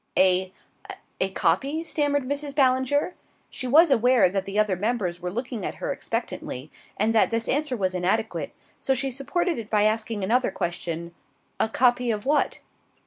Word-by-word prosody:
"A 185 Hz, 0 st, +5 dB, 0.7 s
a -, -, +1 dB
copy?" 295 Hz, +4 st, 0 dB
stammered 290 Hz, -3 st, 0 dB
Mrs. 285 Hz, 0 st, -3 dB
Ballinger. 265 Hz, +4 st, +2 dB, 0.4 s
She 255 Hz, -, -3 dB
was 310 Hz, +5 st, +6 dB
aware 245 Hz, -5 st, +4 dB
that 195 Hz, +1 st, -2 dB
the 195 Hz, +1 st, -4 dB
other 210 Hz, -3 st, +2 dB
members 195 Hz, -3 st, -2 dB
were 180 Hz, 0 st, -4 dB
looking 235 Hz, +1 st, -4 dB
at -, -, -3 dB
her -, -, -3 dB
expectantly, 130 Hz, +5 st, -4 dB, 0.3 s
and 225 Hz, -, +2 dB
that 220 Hz, -, +4 dB
this 230 Hz, 0 st, -2 dB
answer 285 Hz, -2 st, 0 dB
was 185 Hz, -3 st, -1 dB
inadequate, 195 Hz, +5 st, -1 dB, 0.3 s
so 270 Hz, -, +1 dB
she 270 Hz, +1 st, -1 dB
supported 325 Hz, +5 st, -1 dB
it 220 Hz, -2 st, -8 dB
by 210 Hz, -1 st, +3 dB
asking 215 Hz, -1 st, 0 dB
another 245 Hz, +6 st, +2 dB
question. 170 Hz, -1 st, -4 dB, 0.5 s
"A 220 Hz, -, +1 dB
copy 245 Hz, +1 st, +2 dB
of 210 Hz, -2 st, -2 dB
what?" 295 Hz, +2 st, +1 dB
230 Hz, 165 wpm, -25 LUFS, 195-270 Hz, 0.7 s, was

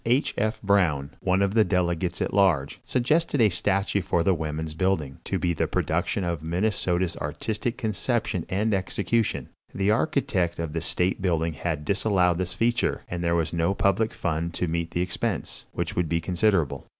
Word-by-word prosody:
H. 125 Hz, +5 st, +2 dB
F. 110 Hz, +1 st, -1 dB
Brown, 85 Hz, -9 st, +2 dB
one 95 Hz, +1 st, +2 dB
of 100 Hz, 0 st, 0 dB
the 110 Hz, -1 st, +5 dB
delegates 90 Hz, -2 st, 0 dB
at -, -, -3 dB
large, 90 Hz, -9 st, +2 dB
suggested 145 Hz, +4 st, +1 dB
a 110 Hz, -3 st, +6 dB
statue 100 Hz, +2 st, 0 dB
for 90 Hz, -3 st, +1 dB
the 95 Hz, -, +3 dB
Woman's 80 Hz, -1 st, -3 dB
Building, 80 Hz, -6 st, -1 dB
to -, -, -1 dB
be 85 Hz, -1 st, 0 dB
the 80 Hz, -, 0 dB
production 85 Hz, +4 st, -1 dB
of 85 Hz, -3 st, -2 dB
Minnesota's 90 Hz, 0 st, 0 dB
artistic 110 Hz, +11 st, -3 dB
conception 110 Hz, -5 st, -1 dB
and 105 Hz, +3 st, +1 dB
execution. 100 Hz, +3 st, 0 dB, 0.3 s
The 100 Hz, +2 st, +2 dB
architect 105 Hz, -, +1 dB
of 80 Hz, -2 st, -4 dB
the 80 Hz, -, -2 dB
state 90 Hz, +5 st, 0 dB
building 85 Hz, -3 st, +1 dB
had 75 Hz, 0 st, -3 dB
disallowed 95 Hz, -2 st, +2 dB
this 90 Hz, 0 st, -3 dB
feature, 120 Hz, +3 st, +1 dB
and 85 Hz, 0 st, -3 dB
there 85 Hz, 0 st, +2 dB
was 80 Hz, -1 st, 0 dB
no 85 Hz, +3 st, +1 dB
public 105 Hz, +3 st, +2 dB
fund 85 Hz, 0 st, -2 dB
to 90 Hz, -, -1 dB
meet 85 Hz, +1 st, -1 dB
the 85 Hz, -, -1 dB
expense, 90 Hz, 0 st, -3 dB
which -, -, -3 dB
would 90 Hz, -3 st, 0 dB
be 85 Hz, -, +1 dB
considerable. 90 Hz, -2 st, +1 dB
90 Hz, 175 wpm, -26 LUFS, 85-100 Hz, 0.3 s, a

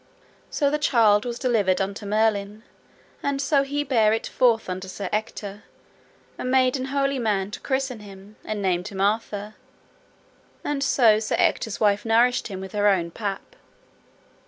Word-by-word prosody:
So 285 Hz, -2 st, +1 dB
the 300 Hz, -, 0 dB
child 225 Hz, -7 st, +3 dB
was 240 Hz, -1 st, -4 dB
delivered 220 Hz, -8 st, +1 dB
unto 200 Hz, +2 st, -3 dB
Merlin, 210 Hz, 0 st, 0 dB, 0.6 s
and 280 Hz, -1 st, -1 dB
so 280 Hz, 0 st, +2 dB
he 285 Hz, +1 st, -2 dB
bare 225 Hz, -6 st, +3 dB
it 225 Hz, -, -2 dB
forth 235 Hz, -3 st, +2 dB
unto 185 Hz, +1 st, -5 dB
Sir 190 Hz, 0 st, -5 dB
Ector, 210 Hz, -1 st, -4 dB, 0.8 s
and 255 Hz, -, -3 dB
made 255 Hz, 0 st, +3 dB
an 260 Hz, -1 st, -3 dB
holy 275 Hz, 0 st, 0 dB
man 205 Hz, -4 st, -1 dB
to -, -, -6 dB
christen 265 Hz, -3 st, -2 dB
him, 200 Hz, 0 st, -13 dB
and 210 Hz, -2 st, -4 dB
named 180 Hz, 0 st, 0 dB
him 200 Hz, -3 st, -7 dB
Arthur; 210 Hz, 0 st, -1 dB, 1.1 s
and 285 Hz, -1 st, -1 dB
so 230 Hz, -6 st, +4 dB
Sir 220 Hz, -, -1 dB
Ector's 220 Hz, -, 0 dB
wife 205 Hz, -2 st, +2 dB
nourished 235 Hz, +2 st, +2 dB
him 195 Hz, -4 st, -6 dB
with 190 Hz, 0 st, -8 dB
her 205 Hz, -1 st, +1 dB
own 175 Hz, -4 st, +2 dB
pap. 200 Hz, -, -5 dB
215 Hz, 160 wpm, -24 LUFS, 200-255 Hz, 1.1 s, so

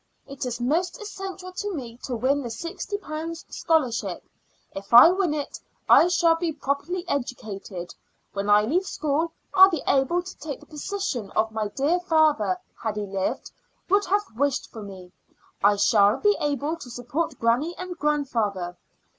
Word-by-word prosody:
It 275 Hz, -2 st, -5 dB
is 240 Hz, -1 st, -4 dB
most 335 Hz, -, 0 dB
essential 385 Hz, -3 st, -7 dB
to 405 Hz, +2 st, -4 dB
me 240 Hz, -4 st, -7 dB
to 250 Hz, -, -3 dB
win 270 Hz, +5 st, +1 dB
the 240 Hz, -, -5 dB
sixty 335 Hz, -, -5 dB
pounds 330 Hz, -3 st, -6 dB
scholarship. 305 Hz, -8 st, 0 dB, 0.5 s
If 195 Hz, +1 st, -9 dB
I 250 Hz, +8 st, +11 dB
win 365 Hz, -5 st, 0 dB
it 290 Hz, -2 st, -5 dB, 0.3 s
I 335 Hz, -, +7 dB
shall 340 Hz, -2 st, +3 dB
be 330 Hz, -1 st, -2 dB
properly 295 Hz, +6 st, -3 dB
educated. 210 Hz, -9 st, -4 dB, 0.4 s
When 200 Hz, +1 st, -2 dB
I 205 Hz, 0 st, +6 dB
leave 350 Hz, -, 0 dB
school 310 Hz, +2 st, -1 dB, 0.2 s
I'll 380 Hz, +1 st, +9 dB
be 330 Hz, -7 st, -3 dB
able 280 Hz, +7 st, +2 dB
to 370 Hz, -, -10 dB
take 285 Hz, -2 st, -6 dB
the -, -, -16 dB
position 300 Hz, -, -4 dB, 0.2 s
my 220 Hz, -1 st, -2 dB
dear 285 Hz, -, +1 dB
father, 310 Hz, -, +2 dB, 0.2 s
had 220 Hz, -2 st, -2 dB
he 210 Hz, -, -2 dB
lived, 195 Hz, -1 st, -3 dB, 0.4 s
would 400 Hz, +2 st, +3 dB
have 405 Hz, +3 st, +2 dB
wished 280 Hz, +2 st, 0 dB
for 225 Hz, -, -8 dB
me. 190 Hz, -3 st, -10 dB, 0.5 s
I 205 Hz, +1 st, +6 dB
shall 205 Hz, 0 st, +4 dB
be 415 Hz, 0 st, +3 dB
able 290 Hz, +2 st, -1 dB
to 265 Hz, -, -10 dB
support 245 Hz, +7 st, -3 dB
granny 250 Hz, +9 st, +1 dB
and 365 Hz, -1 st, -6 dB
grandfather. 225 Hz, -12 st, -1 dB
285 Hz, 165 wpm, -25 LUFS, 225-345 Hz, 0.5 s, I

